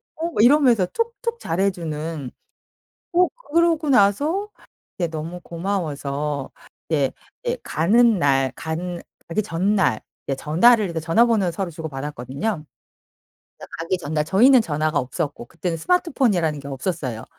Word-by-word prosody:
어." 335 Hz, +2 st, -3 dB
이러면서 245 Hz, -6 st, +5 dB
툭툭 470 Hz, -, -3 dB
잘해주는 165 Hz, -6 st, -2 dB, 0.8 s
어 360 Hz, +1 st, +5 dB, 0.3 s
그러고 330 Hz, -2 st, +3 dB
나서 285 Hz, -, +3 dB, 0.5 s
그때 175 Hz, -2 st, 0 dB
너무 165 Hz, +3 st, -5 dB
고마워서 150 Hz, -6 st, -3 dB, 0.4 s
네. 145 Hz, -5 st, +1 dB, 0.3 s
예. 485 Hz, +1 st, 0 dB
가는 220 Hz, +6 st, +3 dB
날 135 Hz, -2 st, +2 dB
간 170 Hz, +2 st, -4 dB, 0.3 s
가기 205 Hz, +5 st, -1 dB
전날 190 Hz, -, +1 dB, 0.3 s
예 135 Hz, -, +1 dB
전화를 185 Hz, -, +3 dB
전화번호 190 Hz, +4 st, +2 dB
서로 180 Hz, +1 st, -3 dB
주고받았거든요. 150 Hz, -, -4 dB, 1.1 s
가기 170 Hz, +3 st, -1 dB
전날 150 Hz, -1 st, -1 dB
저희는 240 Hz, -, +5 dB
전화가 155 Hz, -2 st, 0 dB
없었고 140 Hz, 0 st, -3 dB
그때는 170 Hz, +2 st, -3 dB
스마트폰이라는 200 Hz, -, +1 dB
게 140 Hz, -, -9 dB
없었어요. 130 Hz, -5 st, -4 dB
170 Hz, 275 characters per minute, -22 LUFS, 150-230 Hz, 1.1 s, 이러면서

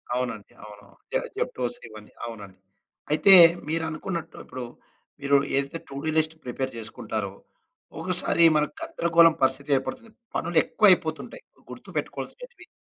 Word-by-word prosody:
అవునండి. 125 Hz, -5 st, -4 dB
అవును, 105 Hz, -1 st, -12 dB
అవును. 100 Hz, -, -23 dB, 0.2 s
జే -, -, +2 dB, 0.2 s
జెప్టోస్ 120 Hz, -1 st, -2 dB
ఇవన్ని 110 Hz, -1 st, -14 dB
అవునండి. 105 Hz, -5 st, -10 dB, 0.5 s
అయితే, 195 Hz, +6 st, +7 dB, 0.4 s
మీరు 165 Hz, +1 st, -1 dB
అనుకున్నట్టు 165 Hz, 0 st, -6 dB
ఇప్పుడు, 130 Hz, 0 st, -7 dB, 0.6 s
మీరు 140 Hz, 0 st, +3 dB, 0.2 s
ఏదైతే 140 Hz, +4 st, -3 dB
టూడూ 140 Hz, +3 st, -5 dB
లిస్ట్ 160 Hz, 0 st, +2 dB
ప్రిపేర్ 130 Hz, +1 st, -4 dB
చేసుకుంటారో, 110 Hz, -2 st, -5 dB, 0.7 s
ఒకసారి 170 Hz, -, +2 dB
మన 150 Hz, -, +3 dB, 0.2 s
గందరగోళం 170 Hz, -, +3 dB
పరిస్థితి 130 Hz, +2 st, 0 dB
ఏర్పడుతుంది. 230 Hz, -, -7 dB, 0.2 s
పనులు 170 Hz, 0 st, -2 dB
ఎక్కువ 215 Hz, -2 st, +4 dB
అయిపోతుంటాయి 170 Hz, -, -1 dB, 0.3 s
గుర్తుపెట్టుకోవాల్సినేటివి 485 Hz, -7 st, -7 dB
150 Hz, 120 wpm, -25 LUFS, 120-170 Hz, 0.7 s, అయితే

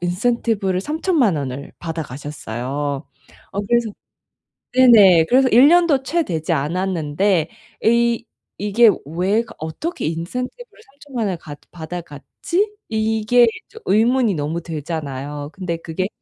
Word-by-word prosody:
인센티브를 195 Hz, 0 st, 0 dB
30,000,000 300 Hz, -, +1 dB
원을 140 Hz, 0 st, -5 dB
받아 165 Hz, -1 st, -4 dB
가셨어요. 140 Hz, +1 st, -5 dB, 0.5 s
어 200 Hz, -, -1 dB
그래서 235 Hz, -2 st, +2 dB, 0.8 s
네네. 210 Hz, -10 st, +7 dB
그래서 260 Hz, +1 st, +4 dB
'1 250 Hz, +6 st, +7 dB
년도 335 Hz, -5 st, +4 dB
채 335 Hz, +6 st, +1 dB
되지 160 Hz, -, -2 dB
않았는데 170 Hz, +2 st, 0 dB, 0.3 s
이 235 Hz, +1 st, +2 dB, 0.4 s
이게 215 Hz, +2 st, +5 dB, 0.2 s
왜 185 Hz, +8 st, 0 dB
거 230 Hz, -, -14 dB
어떻게 160 Hz, -, -5 dB
인센티브를 250 Hz, -, -5 dB
30,000,000 275 Hz, -6 st, -5 dB
원을 185 Hz, -3 st, -2 dB
갖 145 Hz, -2 st, -10 dB
받아 175 Hz, +1 st, -6 dB
갔지?' 340 Hz, -, -3 dB, 0.2 s
이게 220 Hz, +2 st, +3 dB, 0.2 s
좀 -, -, -13 dB
의문이 225 Hz, +2 st, +3 dB
너무 155 Hz, +2 st, -2 dB
들잖아요. 145 Hz, -3 st, -5 dB
근데 180 Hz, -4 st, -4 dB
그게 165 Hz, +3 st, -3 dB
190 Hz, 250 characters per minute, -20 LUFS, 160-240 Hz, 0.8 s, 네네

